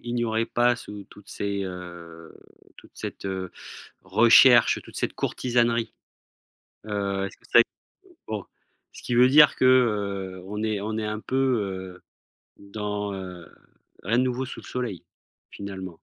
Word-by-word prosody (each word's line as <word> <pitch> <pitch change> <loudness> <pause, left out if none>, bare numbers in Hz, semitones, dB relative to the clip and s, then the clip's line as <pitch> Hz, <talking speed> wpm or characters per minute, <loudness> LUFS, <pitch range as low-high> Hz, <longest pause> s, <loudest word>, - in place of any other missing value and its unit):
il 120 0 -4
n'y 120 0 0
aurait 110 0 0
pas 120 0 +2
sous 105 -4 -9
toutes 105 - -16
ces, 100 -1 -3
heu, 85 -3 -9 0.4
toute - - -17
cette, - - -7
heu, 95 -1 -4 0.5
recherche, 120 +2 +6
toute - - -13
cette - - -2
courtisanerie? 120 -2 0 0.9
Heu, 100 -2 -2
est-ce - - -9
que - - +5 0.6
bon. 105 -3 -4 0.5
Ce - - -13
qui - - -3
veut 125 +1 +7
dire 150 +2 +7
que, 130 - +1
heu, 100 -7 +2
on 105 +2 -4
est 110 -2 -1
on 110 +1 -3
est 110 - -2
un 105 0 -3
peu, 130 - -5 0.6
heu, - - -25 0.6
dans, 105 0 -4
heu, 90 -3 -8 0.6
à 115 +6 +1
nouveau 130 +1 0
sous 130 - -8
le - - -15
soleil, 115 -9 -4 0.5
finalement. 95 -2 -7
105 Hz, 150 wpm, -25 LUFS, 95-120 Hz, 0.9 s, veut